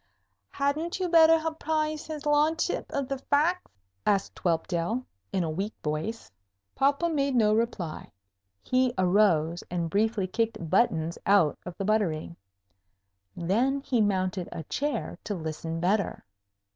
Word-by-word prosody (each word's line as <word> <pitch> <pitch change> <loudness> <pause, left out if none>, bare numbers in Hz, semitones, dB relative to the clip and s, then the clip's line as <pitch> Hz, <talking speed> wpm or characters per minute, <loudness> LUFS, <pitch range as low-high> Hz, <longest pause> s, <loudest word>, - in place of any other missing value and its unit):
"Hadn't 305 +6 -1
you 370 - 0
better 325 -1 +7
apprise 310 -1 -1
his 310 -2 -6
ludship 300 +2 +1
of 280 -2 -2
the 275 0 -3
facks?" 315 +7 +1 0.3
asked 200 -1 0
Whelpdale, 175 +7 0 0.3
in 185 - 0
a 165 - -2
weak 195 +7 -3
voice. 155 - -3 0.4
Popham 285 +5 +1
made 280 -2 +1
no 215 -3 +4
reply. 215 -8 -2 0.5
He 255 -1 +1
arose 180 -3 +3
and 170 -2 -2
briefly 215 -1 +1
kicked 220 -4 -2
Buttons 170 -6 +2
out 190 -7 +4
of 180 - -7
the 195 - -3
buttery. 170 - 0 1.0
Then 235 +11 +1
he 250 -4 +1
mounted 185 -3 0
a 160 - -6
chair 290 - -3
to 205 - -3
listen 160 0 -4
better. 195 +4 0
215 Hz, 135 wpm, -28 LUFS, 175-280 Hz, 1.0 s, better